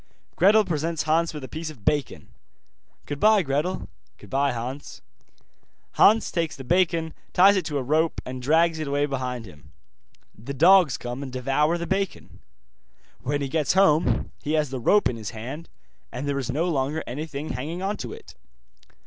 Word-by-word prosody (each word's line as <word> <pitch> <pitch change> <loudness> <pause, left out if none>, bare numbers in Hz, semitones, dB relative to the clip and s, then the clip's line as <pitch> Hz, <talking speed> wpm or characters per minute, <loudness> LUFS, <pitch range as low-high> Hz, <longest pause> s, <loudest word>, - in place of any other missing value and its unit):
Gretel 210 +4 +5
presents 165 -1 -2
Hans 160 +2 +1
with 150 -3 -8
a - - -6
piece 160 +4 -6
of 130 -10 -13
bacon. 145 -2 -1 0.8
'Goodbye, 200 +8 +3
Gretel.' 150 +6 -2 0.3
'Goodbye, 135 +7 -1
Hans.' 125 +4 -6 0.9
Hans 220 +2 +4
takes 165 -3 -1
the 135 - -9
bacon, 165 +1 +1 0.2
ties 195 +3 +6
it 190 - 0
to 150 -3 -2
a 135 - -2
rope, 155 +5 +1
and 130 0 -6
drags 160 +4 +2
it 155 - -3
away 145 +1 +1
behind 125 -4 -4
him. 75 -6 -16 0.6
The 130 +6 -7
dogs 175 -2 +5
come 120 +2 -6
and 135 -2 -6
devour 135 +6 +1
the 170 - -4
bacon. 195 +1 -3 0.8
When 145 +2 -2
he 140 - -1
gets 150 -1 0
home, 180 -5 +3
he 150 - -2
has 150 -4 +1
the 130 - -3
rope 205 - +4
in 125 - -4
his 110 -2 -6
hand, 135 +9 -7 0.4
and 140 +3 -5
there 140 -1 -1
is 135 - -4
no 155 +7 0
longer 150 -1 -1
anything 145 +3 -5
hanging 160 +8 -4
on 200 +2 -1
to 120 - -6
it. - - -11
150 Hz, 175 wpm, -25 LUFS, 130-170 Hz, 0.9 s, ties